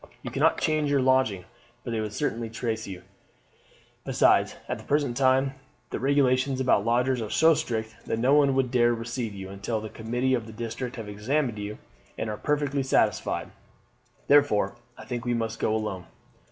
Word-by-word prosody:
You - - -5
cannot - - +3
change 155 -2 +1
your 140 -1 +3
lodging, 130 -8 +2 0.4
for 120 - -5
they 115 -1 -1
would 105 -1 -3
certainly 115 -2 -2
trace 110 -1 -3
you; 90 -2 -8 1.0
besides, - - +3
at - - -3
the - - -11
present 145 -4 0
time 135 +1 +3 0.4
the - - -3
regulations 135 -1 +2
about 125 -6 +3
lodgers 125 +2 +1
are 110 - -4
so 160 +7 +5
strict 110 -6 -3
that - - -1
no 125 +4 +3
one 140 -2 +4
would 130 -2 +1
dare 120 -2 +3
receive 115 -1 -4
you 95 -1 -7
until 100 +3 -3
the 110 0 -7
committee 120 +4 -1
of 115 -3 -1
the 110 - -10
district 120 +3 -5
have 115 -4 -7
examined 115 +3 -1
you 105 +1 -5 0.4
and 110 - -2
are 105 - -4
perfectly 145 -1 0
satisfied. 130 - 0 0.8
Therefore, 140 -9 +4 0.2
I - - -10
think 120 +1 -4
we 120 -1 0
must 115 -1 -3
go - - +1
alone. 100 -5 -3
120 Hz, 180 wpm, -26 LUFS, 110-135 Hz, 1.0 s, so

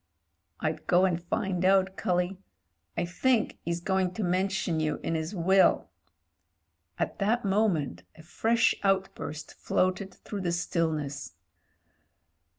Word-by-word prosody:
"I'd 155 0 -3
go 180 +1 +5
and 175 -2 0
find 185 0 -2
out, 190 0 +3
cully. 180 +1 -1 0.6
I 170 - +1
think 220 +6 +1
'e's 170 0 0
going 185 0 0
to 220 - -2
mention 185 -2 0
you 155 -1 -1
in 165 - -1
'is 160 +5 -3
will." 190 +2 +3 1.1
At - - -2
that 215 +3 +1
moment 190 - +1
a 160 - -14
fresh 225 +7 +2
out 195 -1 +2
burst 150 0 -7
floated 185 +1 0
through 205 -2 -7
the 175 -2 -1
stillness. 155 - -2
185 Hz, 130 wpm, -28 LUFS, 170-195 Hz, 1.1 s, go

